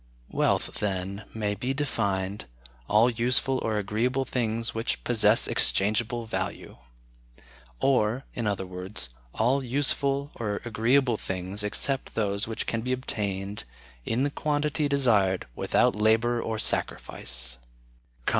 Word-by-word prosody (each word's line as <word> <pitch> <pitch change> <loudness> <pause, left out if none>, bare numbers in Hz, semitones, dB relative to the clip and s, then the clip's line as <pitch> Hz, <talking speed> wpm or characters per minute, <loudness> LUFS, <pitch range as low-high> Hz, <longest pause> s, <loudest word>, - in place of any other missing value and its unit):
Wealth, - - +1
then, 100 0 -2
may 105 -2 -1
be 125 +6 -2
defined, 100 -8 -1 0.4
all 110 +3 +5
useful 125 +2 +2
or 110 -1 0
agreeable 115 +6 0
things 115 -2 -1
which 115 +1 -2
possess 110 -2 +4
exchangeable 110 +4 +1
value; 110 - -4 1.0
or, 125 -1 +2
in 115 -3 -2
other 100 -2 -1
words, 90 -5 -5 0.3
all 130 +5 +2
useful 140 +2 0
or 105 -3 -2
agreeable 120 +2 +2
things 95 +2 -4
except 135 +6 -1
those 100 -1 0
which 110 - -3
can 115 - -1
be 125 +2 -1
obtained, 100 - -2 0.4
in 115 - 0
the 145 - +1
quantity 150 0 0
desired, 110 -10 +3
without - - +2
labor 115 +3 +3
or 110 -1 -2
sacrifice. 60 - -2
110 Hz, 120 wpm, -27 LUFS, 100-125 Hz, 1.0 s, all